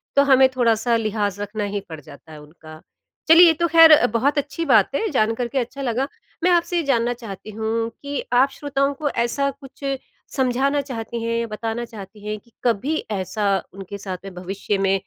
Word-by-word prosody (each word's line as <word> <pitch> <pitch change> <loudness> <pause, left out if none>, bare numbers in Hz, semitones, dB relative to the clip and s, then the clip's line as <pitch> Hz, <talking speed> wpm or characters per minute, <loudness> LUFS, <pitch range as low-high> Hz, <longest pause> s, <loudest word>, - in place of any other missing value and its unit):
तो 280 - +6
हमें 265 0 +7
थोड़ा-सा 235 -1 +2
लिहाज़ 210 -3 -1
रखना 210 +1 -4
ही - - 0
पड़ 160 -1 -7
जाता 145 +2 -15
है 150 -1 -11
उनका। 155 +1 -14 0.5
चलिए 330 +2 +9
ये 325 - +5
तो 340 +2 0
ख़ैर 320 -4 +7
बहुत 270 +6 +1
अच्छी 290 +3 -2
बात 225 -5 +4
है 440 - 0
जानकर 230 -1 0
के 270 - -5
अच्छा 255 +3 -5
लगा, 260 +1 -1 0.4
मैं 365 - +4
आपसे 350 0 +2
ये 335 - +1
जानना 245 -4 +1
चाहती 220 -4 -9
हूँ 225 +1 -2
कि 285 -1 -4
आप 255 +3 +5
श्रोताओं 275 0 -1
को 290 +1 -2
ऐसा 260 +3 0
कुछ 275 0 -16 0.5
समझाना 270 +2 +1
चाहती 235 -3 -6
हैं, 230 0 -1
बताना 225 +2 -4
चाहती 210 -2 -12
हैं 215 0 -2
कि 235 - -28
कभी 245 +6 0 0.2
ऐसा 200 +1 -1 0.2
उनके 195 +1 -8
साथ 190 -2 -6
में 195 - -8
भविष्य 195 +3 -3
में 195 0 +1
235 Hz, 190 wpm, -22 LUFS, 205-275 Hz, 0.5 s, चलिए